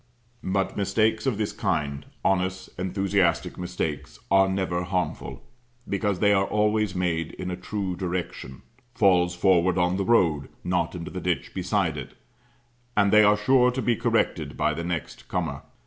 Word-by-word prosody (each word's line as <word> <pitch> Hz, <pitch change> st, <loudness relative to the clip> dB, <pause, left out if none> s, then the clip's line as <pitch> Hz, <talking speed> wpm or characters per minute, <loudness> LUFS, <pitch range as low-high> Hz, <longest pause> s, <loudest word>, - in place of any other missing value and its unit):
But 95 Hz, +1 st, -1 dB
mistakes 110 Hz, +4 st, +1 dB
of 120 Hz, -6 st, +1 dB
this 105 Hz, -1 st, -1 dB
kind 70 Hz, -1 st, -2 dB, 0.2 s
honest, 95 Hz, 0 st, 0 dB
enthusiastic 95 Hz, -2 st, 0 dB
mistakes 80 Hz, -8 st, -4 dB
are 95 Hz, 0 st, +5 dB
never 95 Hz, -2 st, -1 dB
harmful; 90 Hz, 0 st, -3 dB, 0.4 s
because 100 Hz, -1 st, 0 dB
they 100 Hz, +3 st, +4 dB
are 95 Hz, 0 st, +2 dB
always 105 Hz, -2 st, +1 dB
made 85 Hz, -3 st, -1 dB
in 90 Hz, 0 st, -5 dB
a -, -, -2 dB
true 95 Hz, 0 st, -4 dB
direction, 85 Hz, -7 st, -5 dB, 0.3 s
falls 90 Hz, -4 st, +3 dB
forward 90 Hz, 0 st, +3 dB
on 90 Hz, +1 st, +2 dB
the 100 Hz, -, 0 dB
road, 85 Hz, -10 st, +2 dB
not -, -, -1 dB
into -, -, -6 dB
the -, -, -5 dB
ditch -, -, -2 dB
beside -, -, 0 dB
it; -, -, -8 dB, 0.8 s
and 100 Hz, -1 st, +4 dB
they 105 Hz, 0 st, +8 dB
are 105 Hz, 0 st, +5 dB
sure 125 Hz, +4 st, +4 dB
to 130 Hz, +1 st, -2 dB
be 120 Hz, -, +2 dB
corrected -, -, 0 dB
by -, -, +1 dB
the 85 Hz, -, -4 dB
next 85 Hz, -5 st, -5 dB
comer. -, -, -3 dB
95 Hz, 160 wpm, -25 LUFS, 90-105 Hz, 0.8 s, they